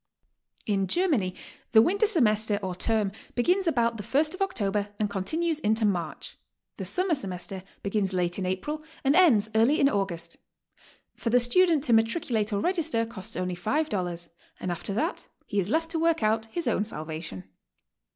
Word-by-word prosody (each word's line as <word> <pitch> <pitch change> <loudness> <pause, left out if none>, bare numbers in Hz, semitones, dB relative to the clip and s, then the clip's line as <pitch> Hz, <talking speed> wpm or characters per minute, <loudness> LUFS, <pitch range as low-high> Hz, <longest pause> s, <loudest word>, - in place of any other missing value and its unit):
In 195 -2 0
Germany 250 - +1 0.4
the 220 - +9
winter 405 - +2
semester 215 - +2
or 185 -1 -2
term 210 +2 0 0.2
begins 360 +9 +2
about 235 -6 +2
the - - -5
first 300 - +1
of 370 - -9
October 205 - -1
and 210 -2 -1
continues 315 - -1
into 220 -4 +2
March; 175 -6 -3 0.4
the - - -5
summer 370 -1 0
semester 190 - -4 0.2
begins 200 -1 0
late 175 0 -1
in 190 - -2
April 295 +12 -3 0.2
and 275 +2 +3
ends 235 - +5
early 230 +7 +4
in 275 - +5
August. 180 -7 -2 0.8
For 230 - -3
the 245 +2 +5
student 315 +5 +3
to 240 - +2
matriculate 225 -1 +1
or 200 -1 0
register 325 -10 0
costs 205 -5 -8
only 180 0 -2
$5, 180 - -2 0.3
and 185 - -3
after 175 +3 -5
that 325 - -2 0.2
be 205 - -1
is 190 0 -1
left 325 +5 0
to 325 - -1
work 330 -5 +2
out 220 +1 +1
his 335 +6 -4
own 215 -3 +2
salvation. 155 - -6
220 Hz, 170 wpm, -27 LUFS, 195-310 Hz, 0.8 s, the